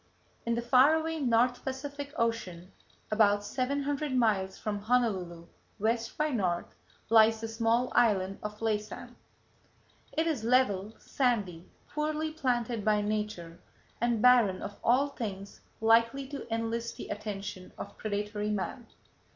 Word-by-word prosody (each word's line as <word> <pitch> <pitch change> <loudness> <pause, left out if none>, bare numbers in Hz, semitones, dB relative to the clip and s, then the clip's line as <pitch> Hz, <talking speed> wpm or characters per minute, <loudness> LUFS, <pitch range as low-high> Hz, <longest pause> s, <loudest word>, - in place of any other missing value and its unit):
In 235 - +2
the 235 - -2
far 260 +5 +6
away 320 0 -2
North 245 -2 +2
Pacific 280 +2 -5
Ocean, 190 -6 -2 0.4
about 205 -1 +4
seven 270 +5 -1
hundred 285 -1 -2
miles 205 -6 +1
from 210 -1 -3
Honolulu 200 -8 0 0.3
west 225 +2 -1
b' 305 0 +1
north, 180 -8 -1 0.3
lies 225 0 +6
the 225 - -4
small 230 +2 +1
island 195 -5 +2
of 210 0 -6
Laysan. 215 -1 -3 1.0
It 320 - +1
is 305 -9 -1
level, 225 -4 +2
sandy, 205 -10 -1 0.2
poorly 310 +1 -2
planted 245 -7 -1
by 210 0 +3
nature, 205 -5 -3 0.4
and 235 -2 +1
barren 240 -7 +5
of 205 - -7
all 265 +4 +3
things 200 -7 -6 0.2
likely 230 +4 +3
to 280 -5 -7
enlist 230 +1 -2
the - - -8
attention 200 -3 -6
of - - -8
predatory 210 0 -2
man. 210 +4 -3
225 Hz, 135 wpm, -30 LUFS, 205-255 Hz, 1.0 s, far